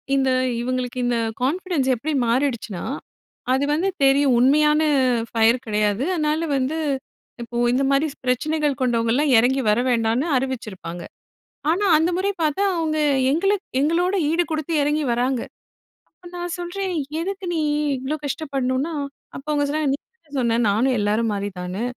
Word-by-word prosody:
இந்த 270 Hz, -1 st, +2 dB, 0.3 s
இவுங்களுக்கு 255 Hz, 0 st, -3 dB
இந்த 245 Hz, -1 st, +1 dB, 0.2 s
கான்ஃபிடன்ஸ் 310 Hz, +1 st, 0 dB
எப்டி 300 Hz, +7 st, -3 dB
மாறிடுச்சுனா, 235 Hz, -6 st, -1 dB, 0.7 s
அது 270 Hz, +2 st, +1 dB
வந்து 355 Hz, +6 st, +1 dB
தெரியும். 270 Hz, -2 st, +4 dB
உண்மையான 300 Hz, +4 st, +4 dB, 0.5 s
ஃபயர் 230 Hz, +3 st, +3 dB
கெடையாது. 210 Hz, +2 st, 0 dB
அதனால 310 Hz, 0 st, 0 dB
வந்து 270 Hz, +5 st, -1 dB, 0.7 s
இப்போ 235 Hz, 0 st, -6 dB, 0.2 s
இந்த 265 Hz, +2 st, +2 dB
மாரி 275 Hz, +3 st, +2 dB, 0.2 s
பிரச்சனைகள் 295 Hz, +2 st, 0 dB
கொண்டவங்கள்லாம் 245 Hz, +4 st, +2 dB
எறங்கி 255 Hz, +4 st, +3 dB
வர 210 Hz, +2 st, +3 dB
வேண்டான்னு 230 Hz, +3 st, +1 dB
அறிவிச்சிருப்பாங்க. 215 Hz, -10 st, -5 dB, 0.7 s
ஆனா, 395 Hz, +5 st, +1 dB
அந்த 325 Hz, +3 st, +1 dB
முறை 385 Hz, +2 st, 0 dB
பாத்தா 310 Hz, +5 st, +1 dB
அவுங்க 315 Hz, -2 st, -1 dB, 0.3 s
எங்களுக் 390 Hz, +5 st, +1 dB, 0.2 s
எங்களோட 340 Hz, +6 st, +1 dB, 0.2 s
ஈடு 335 Hz, +2 st, +2 dB
குடுத்து 315 Hz, +1 st, -2 dB
எறங்கி 295 Hz, +1 st, 0 dB
வராங்க. 250 Hz, +1 st, 0 dB, 0.7 s
அப்ப 350 Hz, +2 st, -16 dB
நான் 350 Hz, 0 st, -4 dB
சொல்றேன். 370 Hz, +2 st, -3 dB, 0.3 s
எதுக்கு 385 Hz, +1 st, -4 dB
நீ 330 Hz, -, 0 dB, 0.4 s
இவ்வளோ 265 Hz, +4 st, -3 dB
கஷ்டப்படணுன்னா? 275 Hz, 0 st, -2 dB, 0.4 s
அப்போ 275 Hz, -, -12 dB
அவுங்க 290 Hz, -1 st, +1 dB
சொன்னாங்க, 300 Hz, -1 st, 0 dB
"நீ -, -, -1 dB, 0.3 s
தான -, -, -26 dB
சொன்ன 235 Hz, -2 st, +1 dB
நானும் 245 Hz, +6 st, +2 dB
எல்லாரும் 210 Hz, +2 st, +1 dB
மாரி 200 Hz, 0 st, -2 dB
தான்னு! 180 Hz, +4 st, -4 dB
275 Hz, 140 wpm, -22 LUFS, 240-315 Hz, 0.7 s, தெரியும்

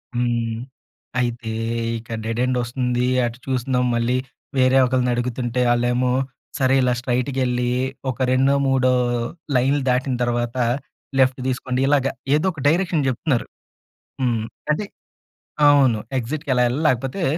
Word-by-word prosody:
హ్మ్. 120 Hz, -2 st, 0 dB, 0.6 s
అయితే 120 Hz, -2 st, -2 dB, 0.5 s
ఇక్కడ 115 Hz, 0 st, -6 dB
డెడ్ 115 Hz, +1 st, -2 dB
ఎండొస్తుంది 125 Hz, 0 st, 0 dB, 0.2 s
అటు 120 Hz, 0 st, -4 dB
చూస్తున్నాం 125 Hz, -1 st, 0 dB
మళ్ళీ 120 Hz, +1 st, +1 dB, 0.4 s
వేరే 130 Hz, 0 st, +4 dB
ఒకళ్ళని 125 Hz, 0 st, +1 dB
అడుగుతుంటే 120 Hz, 0 st, -1 dB
ఆళ్ళేమో 120 Hz, +1 st, +1 dB, 0.5 s
సరే 135 Hz, -2 st, +3 dB
ఇలా 125 Hz, -1 st, +2 dB
స్ట్రెయిట్‌గా 125 Hz, +2 st, -1 dB
ఎళ్లి 125 Hz, 0 st, 0 dB, 0.4 s
ఒక 130 Hz, -, -4 dB
రెండో 135 Hz, +2 st, +3 dB
మూడో 130 Hz, -1 st, +3 dB, 0.6 s
లైన్లు 135 Hz, +3 st, +2 dB
దాటిన 125 Hz, +1 st, +1 dB
తర్వాత 120 Hz, 0 st, -1 dB, 0.6 s
లెఫ్ట్ 130 Hz, 0 st, +3 dB
తీసుకోండి 130 Hz, 0 st, -1 dB
ఇలాగ. 140 Hz, -2 st, +3 dB, 0.3 s
ఏదో 155 Hz, +4 st, +1 dB
ఒక 160 Hz, -5 st, -9 dB
డైరెక్షన్ 165 Hz, -2 st, +2 dB
చెప్తున్నారు. 130 Hz, 0 st, -1 dB, 0.8 s
హ్మ్. 120 Hz, -4 st, +1 dB, 0.3 s
అంటే 180 Hz, +8 st, -1 dB, 0.8 s
అవును. 135 Hz, -6 st, +5 dB, 0.2 s
ఎగ్జిట్‌కెలా 130 Hz, 0 st, 0 dB
ఎళ్ళాలి 145 Hz, +6 st, -2 dB
లేకపోతే 130 Hz, +8 st, -1 dB
125 Hz, 120 wpm, -22 LUFS, 120-135 Hz, 0.8 s, అవును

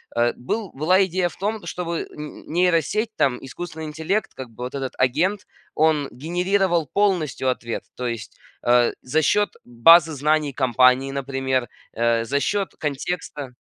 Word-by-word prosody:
э, 120 Hz, 0 st, +2 dB
был 200 Hz, -, -4 dB
была 180 Hz, +7 st, +3 dB
идея 180 Hz, -1 st, 0 dB
в -, -, -14 dB
том, 210 Hz, +2 st, -3 dB
чтобы 170 Hz, -2 st, -3 dB
н 150 Hz, 0 st, -9 dB
нейросеть, 180 Hz, +6 st, +1 dB
там 130 Hz, -3 st, +2 dB
искусственный 160 Hz, +4 st, -7 dB
интеллект, 160 Hz, +7 st, -2 dB
как 130 Hz, -2 st, -8 dB
бы 115 Hz, +2 st, -9 dB
вот 125 Hz, +2 st, -5 dB
этот 135 Hz, -2 st, -3 dB
агент, 175 Hz, +11 st, +1 dB, 0.3 s
он 155 Hz, -2 st, +2 dB
генерировал 175 Hz, +3 st, 0 dB
полностью 170 Hz, -, +1 dB
ответ, 120 Hz, -2 st, -3 dB
то 125 Hz, -, -3 dB
есть, 115 Hz, -2 st, -6 dB, 0.3 s
э, 120 Hz, 0 st, +4 dB
за 150 Hz, +5 st, +1 dB
счет 205 Hz, +7 st, +2 dB, 0.2 s
базы 160 Hz, +7 st, +6 dB
знаний 150 Hz, 0 st, +1 dB
компании, 130 Hz, +1 st, +3 dB
например, 135 Hz, -2 st, -1 dB, 0.3 s
э, 115 Hz, 0 st, +1 dB
за 140 Hz, +4 st, 0 dB
счет 200 Hz, +5 st, -1 dB
контекста. 145 Hz, -2 st, -4 dB
150 Hz, 150 wpm, -23 LUFS, 130-175 Hz, 0.3 s, базы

